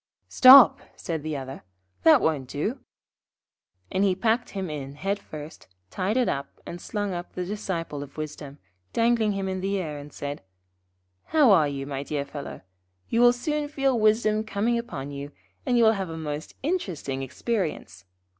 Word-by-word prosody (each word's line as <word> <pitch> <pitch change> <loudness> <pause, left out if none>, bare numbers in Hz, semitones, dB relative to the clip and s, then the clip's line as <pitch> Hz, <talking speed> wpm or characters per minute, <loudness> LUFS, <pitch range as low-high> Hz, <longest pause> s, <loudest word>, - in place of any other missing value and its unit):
'Stop,' 260 -2 +9 0.2
said 160 -3 -4
the 155 -1 -3
other. 135 0 -7 0.4
'That 160 - +6
won't 145 -5 0
do.' 210 - -3 1.1
And 190 - +1
he 190 -2 +3
packed 225 +5 0
him 195 -2 -4
in 140 -3 -6
head 195 +6 -2
first, 150 0 -10 0.2
tied 195 +6 -1
it 250 - +2
up, 140 0 -4
and 175 0 -7
slung 205 -3 -3
up 175 0 -6
the 180 - -3
Disciple 175 -7 -4
of 140 +1 -10
Wisdom, 150 -2 -7 0.4
dangling 230 -2 +2
him 195 -1 -3
in 185 -1 -3
the 195 +1 -1
air, 155 -6 -4
and 145 +1 -11
said: 145 +1 -6 0.8
'How 295 -7 +4
are 160 -6 +5
you, 140 -1 -4
my 140 -1 -4
dear 145 0 -3
fellow? 140 0 -8 0.5
You 230 - +2
will 245 0 +8
soon 295 +4 -2
feel 270 -4 +1
wisdom 215 0 +3
coming 220 +2 0
upon 145 - -6
you, 140 +1 -7 0.3
and 245 -1 +3
will 225 -2 +6
have 195 -5 -3
a 160 - -6
most 150 -1 -5
interesting 180 - -2
experience. 150 - -3
185 Hz, 170 wpm, -26 LUFS, 145-220 Hz, 1.1 s, Stop